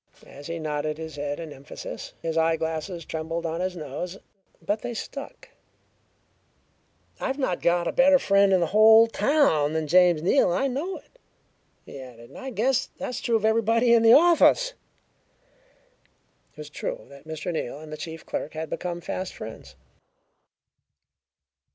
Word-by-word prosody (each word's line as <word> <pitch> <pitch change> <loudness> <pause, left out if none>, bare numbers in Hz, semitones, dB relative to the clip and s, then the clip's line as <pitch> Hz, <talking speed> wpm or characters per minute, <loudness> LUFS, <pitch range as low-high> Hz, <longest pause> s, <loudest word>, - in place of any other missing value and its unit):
As 145 +1 -12
he 170 0 -4
nodded 150 -1 -3
his 160 -1 -7
head 145 +1 -3
in 160 -3 -7
emphasis, 140 +2 -9
his 165 -1 -2
eyeglasses 160 +1 -1
trembled 165 +1 -4
on 165 +1 -2
his 185 0 -2
nose 170 +4 -6 0.4
but 210 +1 -2
they 240 -1 -5
stuck. 275 +5 -8 1.7
"I've 265 - -2
not 260 -11 -1
got 170 0 +2
a - - 0
better 275 +1 +5
friend 200 -5 +3
in 185 -2 +4
the - - +3
whole 220 +1 +8
town 225 - +2
than 160 -1 -1
James 175 0 +4
Neal, 185 +1 +3
and 175 - 0
I - - +2
know 300 +9 -3
it," - - -20 0.7
he 140 - -10
added, 120 -3 -12
"and - - -11
I 265 -1 -6
guess 255 +2 0
that's 250 - -5
true 235 - 0
of 220 -1 +1
everybody 230 +2 +3
in 230 - +5
the 225 0 +7
office!" 350 - +5 1.8
It - - -35
was 150 -1 -9
true - - -5
that 140 +1 -15
Mr. 160 +3 -4
Neal 140 -4 -4
and 155 0 -11
the - - -3
chief 160 +1 -8
clerk 150 - -4
had 160 -1 -5
become 175 -1 -4
fast 185 +2 -5
friends. 70 -11 -10
175 Hz, 165 wpm, -25 LUFS, 155-230 Hz, 1.8 s, whole